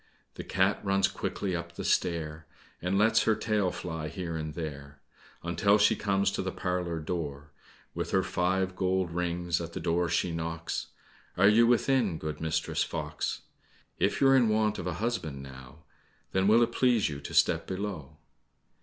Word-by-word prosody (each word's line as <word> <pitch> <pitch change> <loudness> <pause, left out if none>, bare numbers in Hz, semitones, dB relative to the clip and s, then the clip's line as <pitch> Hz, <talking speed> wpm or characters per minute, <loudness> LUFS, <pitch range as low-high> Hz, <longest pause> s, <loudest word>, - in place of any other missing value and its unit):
The - - -7
cat 95 +3 +1
runs 100 -1 +3
quickly 95 -1 -3
up 85 0 -5
the - - -5
stair, 80 -3 0 0.3
And 90 +2 0
lets 110 +2 +4
her 110 - +4
tail 105 -4 0
fly 80 -3 -5
here 85 -1 -5
and 75 -1 -4
there, 70 -3 -7 0.4
Until 85 +5 +3
she 105 - +4
comes 100 -1 +1
to - - -2
the 95 0 -3
parlour 90 -3 -2
door. 75 -3 -5 0.4
With - - -3
her - - +2
five 95 +1 0
gold 95 -1 0
rings 85 0 -1
at 85 0 -6
the - - -4
door 85 +1 0
she 90 - +1
knocks, 80 0 -3 0.5
"Are 95 +2 +6
you 115 +3 +6
within, 120 -6 +2
good 75 0 -5
Mistress 80 -1 0
Fox? - - -4 0.6
If - - +1
you're 135 -1 +6
in 120 -4 +4
want 110 0 +1
of 90 - -4
a 90 - -1
husband 90 - -3
now, 65 +3 -12 0.5
Then 95 +1 +2
will 115 +3 +6
it 120 - 0
please 120 -3 +3
you 70 -1 -5
to - - -8
step - - +3
below? 95 -7 -5
90 Hz, 170 wpm, -29 LUFS, 80-100 Hz, 0.6 s, Are